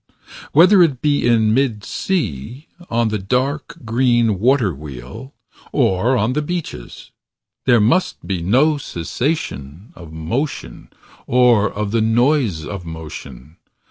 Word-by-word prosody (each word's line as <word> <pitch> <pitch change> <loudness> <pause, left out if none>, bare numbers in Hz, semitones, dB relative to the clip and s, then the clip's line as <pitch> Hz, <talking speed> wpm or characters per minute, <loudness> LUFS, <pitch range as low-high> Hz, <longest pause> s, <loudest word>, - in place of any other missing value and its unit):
Whether 180 +5 +6
it 145 -8 +3
be 145 -4 +2
in 110 -2 +3
mid 120 -5 0
sea 130 - -3 0.2
On 115 -1 +1
the 105 -1 -2
dark, 130 +9 -2
green 120 -3 +2
water 120 -4 +2
wheel. 70 - -10 0.4
Or 110 +8 +2
on 110 +3 0
the 150 - 0
beaches. 150 - -6 0.5
There 120 -3 +5
must 125 - +1
be 95 -3 -2
no 135 - +2
cessation 90 - -4
Of 85 -3 -12
motion, 115 - -4 0.4
or 120 -4 +4
of 105 -1 -3
the 115 0 +1
noise 115 - +1
of 100 0 -6
motion. 80 -3 -9
115 Hz, 125 wpm, -19 LUFS, 90-135 Hz, 0.5 s, Whether